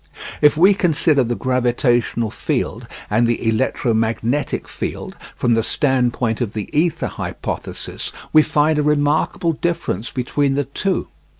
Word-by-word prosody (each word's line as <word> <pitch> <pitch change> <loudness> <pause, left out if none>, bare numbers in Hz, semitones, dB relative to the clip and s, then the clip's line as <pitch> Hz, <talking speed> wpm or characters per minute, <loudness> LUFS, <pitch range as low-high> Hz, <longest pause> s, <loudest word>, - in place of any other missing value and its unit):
If 150 0 +5
we 190 +5 +6
consider 160 -6 +2
the 120 0 -2
gravitational 120 -3 +1
field - - -3 0.2
and 120 - +2
the 115 -1 -1
electromagnetic 115 +2 0
field - - -5 0.2
from 120 - +1
the 115 - +3
stand 130 0 +1
point 115 -1 -2
of 115 -3 -2
the 105 +3 -6
ether 165 +2 +1
hypothesis, - - -5 0.2
we 155 - +8
find 150 0 +2
a - - +3
remarkable 150 +3 +1
difference 145 - -2
between 135 +2 0
the 145 0 0
two. 185 +8 -2
130 Hz, 135 wpm, -20 LUFS, 120-150 Hz, 0.2 s, we